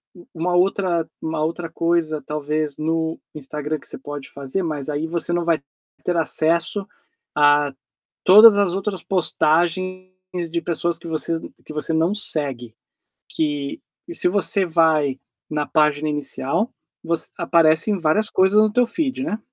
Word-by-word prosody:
u 175 - -16
uma 175 +2 -1
outra 180 -2 +1
uma 160 -1 -2
outra 165 +1 -3
coisa 165 -2 0
talvez 150 0 -2
no 160 +1 -2 0.2
Instagram 150 +1 -4
que - - -11
você - - -5
pode 145 -1 -8
fazer, 140 +7 -4
mas 150 -3 -4
aí 150 +2 -2
você 170 +1 0
não 175 0 0
vai 165 -4 +1 0.4
ter 175 - -1
acesso 165 +5 0 0.5
a 145 -1 +4 0.5
todas 210 +2 +9
as 195 -3 +2
outras 195 -2 -3
postagens 185 +2 0 0.4
de 170 +1 -1
pessoas 170 0 -1
que 170 - -12
vocês 160 +1 0
n - - -10
que - - -9
você 155 +2 -1
não 165 +4 +2
segue. 135 - -2 0.6
Que 145 -3 -2 0.3
e 345 - -7
se - - +3
você 195 0 +3
vai 160 -5 +2 0.3
na 150 -1 -2
página 150 -1 +2
inicial, 145 - -1 0.3
você 165 0 -1
aparecem 165 +4 +3
várias 170 +7 +2
coisas 190 +2 +3
no 215 -1 +4
teu 245 - +4
feed, 265 0 -2
né. 215 - -2
165 Hz, 155 wpm, -21 LUFS, 150-180 Hz, 0.6 s, todas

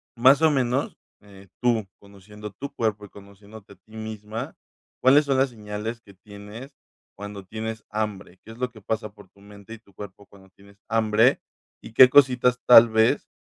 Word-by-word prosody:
más 135 +5 +5
o 160 - +5
menos, 130 0 -1 0.2
eh, 100 -1 -17
tú, 115 -5 0
conociendo 105 +1 -13
tu 140 +6 -9
cuerpo 105 -4 -3
y - - -16
conociéndote 100 +1 -16
a - - -21
ti 110 +4 -20
misma, 110 0 -7 0.5
¿cuáles 140 +3 +5
son 135 -2 0
las 135 0 +2
señales 105 +1 -7
que 100 -3 -18
tienes 105 +7 -12 0.4
cuando 100 -1 -9
tienes 110 +2 -7
hambre? 105 -3 -5
¿Qué - - -17
es 115 - -13
lo 125 -1 -3
que 110 -3 -16
pasa 110 +1 -4
por 100 -3 -18
tu 100 - -26
mente 100 +2 -14
y - - -17
tu 100 -4 -27
cuerpo 100 +1 -12
cuando 95 -1 -20
tienes 100 +1 -22
hambre?, 115 +2 +2 0.4
y 110 - -14
qué 130 +1 +8
cositas 125 -2 +3
tal 115 -1 +8
vez 110 0 +1
110 Hz, 185 wpm, -23 LUFS, 100-120 Hz, 0.5 s, qué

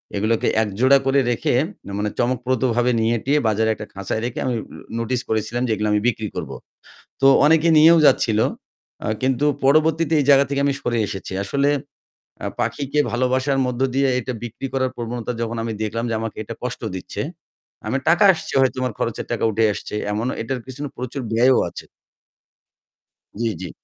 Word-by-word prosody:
এগুলোকে 110 +3 +1
এক 110 - -1
জোড়া 135 +2 +6
করে 135 +1 +3
রেখে, 115 - 0 0.4
মানে, 105 +1 -1
চমকপ্রদভাবে 125 0 +1
নিয়ে-টিয়ে 120 +5 +1
সাজিয়ে - - +4
বাজারে 110 +1 +1
একটা 105 - -7
খাঁচায় 100 +2 -3
রেখে 125 - -4
আমি 125 - 0 0.5
নোটিস 120 +2 -1
করেছিলাম 110 +2 -1
যে - - -1
এগুলো 105 +1 -1
আমি 105 - +2
বিক্রি 110 -3 -1
করব। - - -5 0.7
তো 135 - +4 0.2
অনেকে 160 +2 +4
নিয়েও 165 +2 +7
যাচ্ছিল। 110 -6 +3 0.7
আ - - -2 0.2
কিন্তু 130 +1 +1 0.2
পরবর্তীতে 155 +3 +3
এই - - +1
জায়গা 140 0 +6
থেকে 140 0 -1
আমি 140 - +1
সরে 120 -1 -1
এসেছি। 95 -2 -6
আসলে 140 +7 +1 0.8
আ - - -2
পাখিকে 145 +1 -1
ভালোবাসার 130 +2 +1
মধ্য 125 0 -3
দিয়ে 135 0 +2
এটা 130 +1 -4
বিক্রি 120 +3 -5
করার 130 -1 0
প্রবণতা 120 0 -4
যখন 115 0 -3
আমি 115 -1 -3
দেখলাম 115 +2 -2
যে - - -1
আমাকে 115 -1 -5
এটা 115 - -7
কষ্ট 125 - -4
দিচ্ছে, 90 - -5 0.7
আমার 130 +5 -1
টাকা 175 +5 +4
আসছে, 170 - -7
হয়তো 130 0 +1
আমার 125 - -2
খরচের - - -2
টাকা - - -2
উঠে 110 +2 +2
আসছে। 105 - -7 0.2
এমনও 110 +5 -1
এটার 125 +2 -3
পেছনে 140 +3 -6
প্রচুর 130 +2 -5
ব্যয়ও 125 +3 +4
আছে। - - -10 1.5
জ্বি, 115 -1 +1
জ্বি। 90 - -5
125 Hz, 175 wpm, -21 LUFS, 115-135 Hz, 1.5 s, নিয়েও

